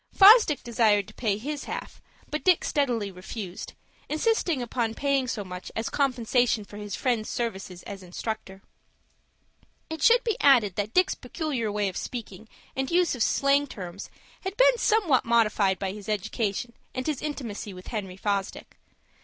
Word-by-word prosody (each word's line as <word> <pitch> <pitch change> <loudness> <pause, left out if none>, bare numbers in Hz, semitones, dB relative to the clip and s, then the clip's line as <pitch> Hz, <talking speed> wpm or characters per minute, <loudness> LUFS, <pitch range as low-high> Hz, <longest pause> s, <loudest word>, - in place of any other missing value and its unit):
Fosdick 405 - +7
desired 220 -4 +2
to - - -13
pay 210 -4 0
his 285 +6 -5
half; - - -6 0.3
but 305 - -2
Dick 365 -3 +4
steadily 240 -9 0
refused, 185 0 -7 0.4
insisting 330 - +1
upon 235 -2 -2
paying 275 -2 +1
so 220 -3 -3
much 180 -1 -8
as 225 - -2
compensation 245 -4 +1
for 205 - -11
his 205 -1 -5
friend's 240 -5 -1
services 195 -6 -4
as 200 -1 -8
instructor. 190 +1 -6 1.3
It 320 - -5
should 475 +1 +5
be 450 -4 -1
added 235 -9 +5
that 210 +1 -3
Dick's 370 +1 +4
peculiar 265 - -3
way 205 -1 0
of 185 - -4
speaking 220 -3 -7 0.3
and 265 0 -1
use 350 0 +3
of 250 - -5
slang 280 +4 +3
terms 185 -5 -8 0.3
had 385 +1 -5
been - - +5
somewhat 390 - +3
modified 215 -4 +2
by 195 -1 -3
his 205 +1 -9
education 210 +2 -2 0.2
and 255 0 -3
his 305 -4 -2
intimacy 240 -9 -5
with 185 -1 -11
Henry 195 -4 -5
Fosdick. 200 -1 -3
230 Hz, 160 wpm, -27 LUFS, 205-285 Hz, 1.3 s, Fosdick